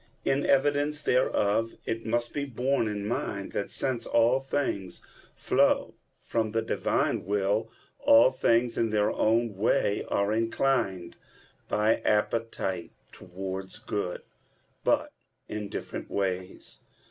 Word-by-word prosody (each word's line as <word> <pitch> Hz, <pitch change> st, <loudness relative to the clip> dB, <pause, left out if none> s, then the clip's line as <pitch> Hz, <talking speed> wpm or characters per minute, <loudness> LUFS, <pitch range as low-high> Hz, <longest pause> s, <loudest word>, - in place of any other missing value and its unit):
In 135 Hz, +1 st, +1 dB
evidence 145 Hz, +2 st, +2 dB
thereof, 115 Hz, -3 st, +1 dB
it 115 Hz, 0 st, -3 dB
must 120 Hz, +1 st, -1 dB
be 145 Hz, -, -2 dB
borne 130 Hz, -2 st, 0 dB
in 105 Hz, -1 st, -3 dB
mind 100 Hz, -3 st, -3 dB
that, 100 Hz, -, -3 dB
since 130 Hz, -3 st, -1 dB
all 120 Hz, +3 st, +3 dB
things 135 Hz, -9 st, -3 dB, 0.3 s
flow -, -, +2 dB, 0.2 s
from 110 Hz, -2 st, -2 dB
the 115 Hz, 0 st, +1 dB
Divine -, -, 0 dB
will, 105 Hz, +3 st, 0 dB, 0.3 s
all 115 Hz, +3 st, +6 dB
things 120 Hz, -2 st, +2 dB
in 115 Hz, -, +2 dB
their 105 Hz, 0 st, +2 dB
own 115 Hz, -1 st, +1 dB
way 100 Hz, 0 st, +1 dB
are 100 Hz, +1 st, +1 dB
inclined 115 Hz, -6 st, 0 dB, 0.5 s
by 105 Hz, +1 st, +3 dB
appetite 105 Hz, -4 st, -1 dB, 0.2 s
towards 95 Hz, +1 st, -6 dB
good, 90 Hz, -4 st, -4 dB, 0.6 s
but -, -, +1 dB, 0.3 s
in 105 Hz, -1 st, -5 dB
different -, -, -6 dB
ways. 95 Hz, -2 st, -3 dB
110 Hz, 120 wpm, -28 LUFS, 100-120 Hz, 0.6 s, all